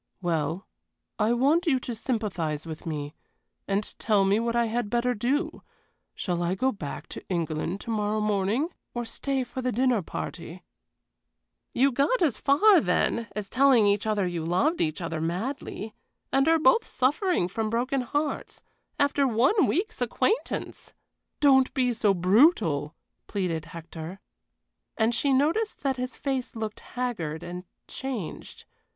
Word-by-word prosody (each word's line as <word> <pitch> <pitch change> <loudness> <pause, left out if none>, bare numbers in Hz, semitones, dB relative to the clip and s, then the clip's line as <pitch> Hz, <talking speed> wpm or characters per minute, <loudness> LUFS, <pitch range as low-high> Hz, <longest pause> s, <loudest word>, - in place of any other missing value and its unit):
"Well, 170 0 -1 0.5
I 215 +1 +3
want 295 +8 +2
you 265 -5 +3
to 245 - -4
sympathize 200 - -2
with 160 0 -8
me, 145 -2 -4 0.5
and 200 +1 +1 0.2
tell 205 -3 +3
me 200 +2 +3
what 235 0 -1
I 235 0 +3
had 230 -1 -2
better 240 +2 +1
do. 290 - -1 0.5
Shall 175 -2 -2
I 175 +2 0
go 260 +7 +1
back 150 - -6
to - - -7
England 170 +1 -2
to 230 - -5
morrow 210 0 0
morning, 210 - +1 0.3
or 240 0 -2
stay 270 +3 -2
for 260 +1 -6
the 255 0 0
dinner 245 -1 +2
party?" 170 +1 -7 1.1
"You 275 +2 +3
got 280 - +2
as 310 -9 +1
far, 360 +8 +5
then, 225 - 0
as 210 -2 -3
telling 255 -2 +4
each 205 +1 +2
other 210 -3 +1
you 175 -2 -3
loved 185 - +1
each 155 +2 -1
other 165 -2 -3
madly 215 - -4 0.4
and 270 +2 +3
are 325 0 +5
both 310 - +4
suffering 290 - +1
from 215 +4 -2
broken 255 +4 0
hearts, 290 +4 -3 0.3
after 285 -1 +2
one 265 - +3
week's 385 +6 -1
acquaintance." 445 +3 -1 0.5
"Don't 265 -3 +5
be 250 -2 +2
so 210 -3 +2
brutal!" 180 - +3 0.3
pleaded 175 -5 -2
Hector. 165 +2 -8 0.8
And 225 +1 +2
she 275 +4 +1
noticed 315 +12 +1
that 270 -2 0
his 250 +1 -4
face 265 -4 -3
looked 220 -1 -4
haggard 200 -11 -4
and 180 +1 -7 0.2
changed. 255 -10 -6
225 Hz, 150 wpm, -27 LUFS, 180-270 Hz, 1.1 s, far